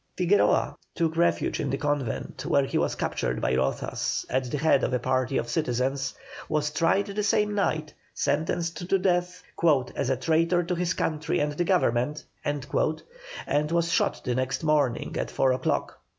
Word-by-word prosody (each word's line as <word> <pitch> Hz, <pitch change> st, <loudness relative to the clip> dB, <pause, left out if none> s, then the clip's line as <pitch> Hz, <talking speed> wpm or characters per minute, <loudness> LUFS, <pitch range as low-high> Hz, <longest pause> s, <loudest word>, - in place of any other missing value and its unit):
Figueroa 185 Hz, +3 st, +3 dB, 0.2 s
took 165 Hz, -2 st, 0 dB
refuge 170 Hz, +1 st, +1 dB
in 140 Hz, -, -1 dB
a 135 Hz, -, 0 dB
convent, 145 Hz, -5 st, -2 dB
where 140 Hz, -1 st, +3 dB
he -, -, -1 dB
was -, -, 0 dB
captured -, -, -2 dB
by -, -, 0 dB
Rozas 65 Hz, +1 st, -1 dB
at 130 Hz, +1 st, +1 dB
the 125 Hz, +4 st, -3 dB
head 150 Hz, -2 st, +3 dB
of -, -, +1 dB
a -, -, +3 dB
party 130 Hz, +1 st, 0 dB
of -, -, -1 dB
citizens, 135 Hz, -2 st, -1 dB, 0.3 s
was 150 Hz, 0 st, 0 dB
tried 170 Hz, +6 st, +2 dB
that 205 Hz, +1 st, -3 dB
same 210 Hz, 0 st, +2 dB
night, 155 Hz, -7 st, -1 dB, 0.2 s
sentenced 165 Hz, +4 st, -1 dB
to 195 Hz, -, +4 dB
death 180 Hz, -1 st, 0 dB, 0.5 s
"as 140 Hz, -, -1 dB
a 130 Hz, -, +1 dB
traitor 165 Hz, +5 st, +2 dB
to 175 Hz, +2 st, -2 dB
his 175 Hz, -1 st, -1 dB
country 155 Hz, +1 st, -1 dB
and 150 Hz, 0 st, 0 dB
the 175 Hz, +4 st, -1 dB
government," 150 Hz, -5 st, +1 dB, 0.2 s
and 150 Hz, -, -2 dB
was 170 Hz, 0 st, +1 dB
shot -, -, +1 dB
the 125 Hz, -, -1 dB
next 130 Hz, +4 st, -1 dB
morning 150 Hz, -6 st, +1 dB
at -, -, -2 dB
four 130 Hz, -, +2 dB
o'clock. 130 Hz, 0 st, -1 dB
150 Hz, 170 wpm, -26 LUFS, 130-175 Hz, 0.5 s, to